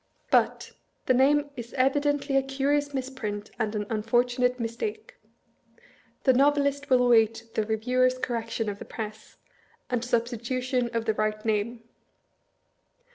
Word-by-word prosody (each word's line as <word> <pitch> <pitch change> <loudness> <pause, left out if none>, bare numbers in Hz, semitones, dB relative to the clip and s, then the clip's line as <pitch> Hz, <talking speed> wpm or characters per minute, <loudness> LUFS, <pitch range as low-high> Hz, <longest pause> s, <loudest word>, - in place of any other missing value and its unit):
But, - - +2 0.3
the 255 - +4
name 285 +3 +3
is 235 0 -8
evidently 285 +1 +1
a 270 - +5
curious 280 +2 0
misprint 255 -6 -4
and 220 -1 -1
an 210 -1 -2
un 215 -1 0
fortunate 245 +2 +1
mistake. 240 - -4 1.1
The 265 - +5
ISTovelist 280 +1 +2
wUl 255 -1 +5
await 225 -1 +3
the - - +1
Eeviewer's 250 +4 +1
correction 230 -2 -2
of 205 -1 -4
the - - -8
press, 215 -1 -8 0.5
and 245 -2 0
substitution 245 +1 -1
of 230 -1 -1
the 220 - +2
right 215 0 -2
name. 225 +2 -1
245 Hz, 130 wpm, -27 LUFS, 225-270 Hz, 1.1 s, a